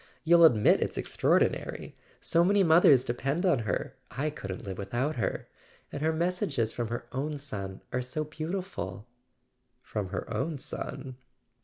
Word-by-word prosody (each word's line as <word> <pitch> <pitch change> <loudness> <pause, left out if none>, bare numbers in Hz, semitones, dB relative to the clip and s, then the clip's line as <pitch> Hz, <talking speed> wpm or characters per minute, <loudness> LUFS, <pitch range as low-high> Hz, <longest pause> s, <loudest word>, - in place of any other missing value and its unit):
You'll 170 +1 +7
admit 110 -9 +5
it's - - -2
ex¬ - - -3
traordinary? - - +1 0.3
So 170 - +3
many 200 +2 +4
mothers 160 -6 +6
depend 135 +9 -1
on 170 -9 +3
her—I 130 +6 -3
couldn't 100 -10 -6
live 95 -1 -6
without 120 +9 -2
her. - - -2 0.4
And 145 - -5
her 160 +1 +2
messages 160 -8 0
from 120 -2 -2
her 120 +2 -4
own 145 +3 -2
son 100 -9 -5
are 130 - +1
so 130 +5 -2
beautiful 160 - -5 0.4
" 125 -1 -47
"From 105 -4 -2
her - - -4
own 150 +8 -1
son?" 130 -1 -5
140 Hz, 155 wpm, -29 LUFS, 120-160 Hz, 0.4 s, You'll